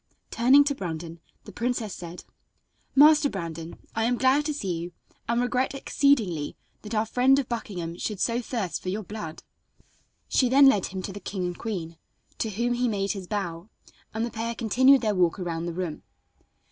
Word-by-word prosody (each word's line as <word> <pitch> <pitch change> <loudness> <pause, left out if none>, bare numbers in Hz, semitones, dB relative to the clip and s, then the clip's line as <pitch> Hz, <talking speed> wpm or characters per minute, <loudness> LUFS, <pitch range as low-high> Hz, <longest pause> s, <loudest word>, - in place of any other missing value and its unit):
Turning 260 +5 +6
to 285 0 0
Brandon 170 - -6 0.2
the 210 - -11
princess 235 -2 -2
said: 175 0 -8 0.7
"Master 295 +1 +7
Brandon, 165 - -6 0.2
I 225 - 0
am 245 +1 +1
glad 265 +4 +3
to 300 - -1
see 195 -10 -2
you, 175 +1 -6 0.4
and 235 0 +2
regret 250 +2 0
exceedingly 225 - +1 0.3
that 215 +1 -6
our 215 +1 +2
friend 255 +4 +4
of 275 -3 -1
Buckingham 180 -8 -4
should 210 -3 -3
so 235 +4 +1
thirst 225 -7 -3
for 185 - -4
your 210 +3 -3
blood." 175 -6 -7 0.8
She 255 - +2
then 275 +2 +7
led 210 -8 +4
him 185 0 -6
to 195 - -5
the 205 - -7
king 190 -1 -4
and 175 0 -3
queen, 175 -8 -5 0.4
to 225 - -1
whom 235 +4 0
he 245 +1 +1
made 200 -3 0
his 195 -3 -6
bow, 185 -2 -4 0.4
and 220 +1 -1
the 235 - -5
pair 230 +1 -3
continued 260 +4 +4
their 215 -3 +1
walk 180 -3 +2
about 170 -2 -3
the - - -2
room. 175 -3 -4
215 Hz, 185 wpm, -26 LUFS, 180-245 Hz, 0.8 s, Master